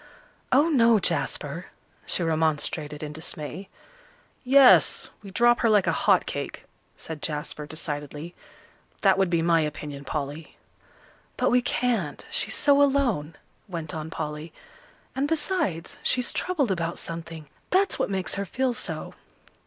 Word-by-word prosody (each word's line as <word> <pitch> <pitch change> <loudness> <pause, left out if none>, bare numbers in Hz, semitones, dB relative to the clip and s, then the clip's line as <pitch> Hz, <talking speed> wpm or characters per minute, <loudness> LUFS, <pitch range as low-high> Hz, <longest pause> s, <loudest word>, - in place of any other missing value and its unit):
"Oh, 285 +5 +5
no, 235 -6 +5
Jasper," 200 - -2 0.4
she 180 - +1
remonstrated 155 -2 -1
in 150 0 -5
dismay. 160 +4 -6 0.7
"Yes, 265 0 +6
we 200 - -10
drop 240 +4 +4
her 230 - +3
like 210 -3 +4
a - - +2
hot - - +3
cake," - - -5 0.3
said 160 -2 -7
Jasper, 150 -1 -4
decidedly; 150 +1 -5 0.7
"that 195 -1 +4
would 190 -2 +3
be 170 -1 +1
my 165 -1 +4
opinion, 150 -2 -5
Polly." 145 +2 -5 0.8
"But - - +2
we 250 +1 +4
can't, 235 -11 -1
she's - - -1
so 285 -1 +4
alone," 245 - +2 0.3
went 165 -5 -5
on 155 0 -5
Polly; 155 0 -5 0.6
"and, 275 +2 0
besides, 295 - -1
she's 250 -1 +1
troubled 305 - 0
about 170 -2 -2
something. 165 -2 -6 0.2
That's 385 +2 +2
what - - 0
makes 190 -2 -2
her 200 0 -2
feel 255 +5 0
so." - - -5
170 Hz, 135 wpm, -26 LUFS, 155-245 Hz, 0.8 s, Yes